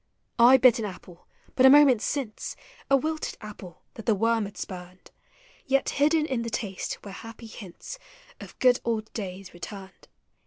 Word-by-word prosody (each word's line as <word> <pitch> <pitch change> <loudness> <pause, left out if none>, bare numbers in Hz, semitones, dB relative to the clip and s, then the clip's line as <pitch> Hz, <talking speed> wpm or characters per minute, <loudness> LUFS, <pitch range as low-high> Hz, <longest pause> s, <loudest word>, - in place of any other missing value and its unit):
I 245 +3 +8
bit 255 -2 +5
an 220 - -2
apple 180 -3 -10 0.3
but 255 - +2
a 265 - +9
moment 275 -5 +7
since, 265 -6 -3 0.2
— - - -25
A 275 - +6
wilted 310 +3 -3
apple 205 -5 -11
that 225 - -11
the 220 - +4
worm 225 +1 +1
had 200 - -10
spurned, 180 -1 -9 0.3
— - - -27
Yet 270 0 +2
hidden 305 +2 +2
in 260 -6 -2
the 230 - -3
taste 205 -4 -4
were 200 - -7
happy 225 +3 -10
hiuts 215 - -10 0.4
Of - - -11
good 250 -1 +4
old 225 -2 -2
days 195 -3 -6
returned. 190 +2 -10
225 Hz, 180 wpm, -26 LUFS, 195-265 Hz, 0.4 s, a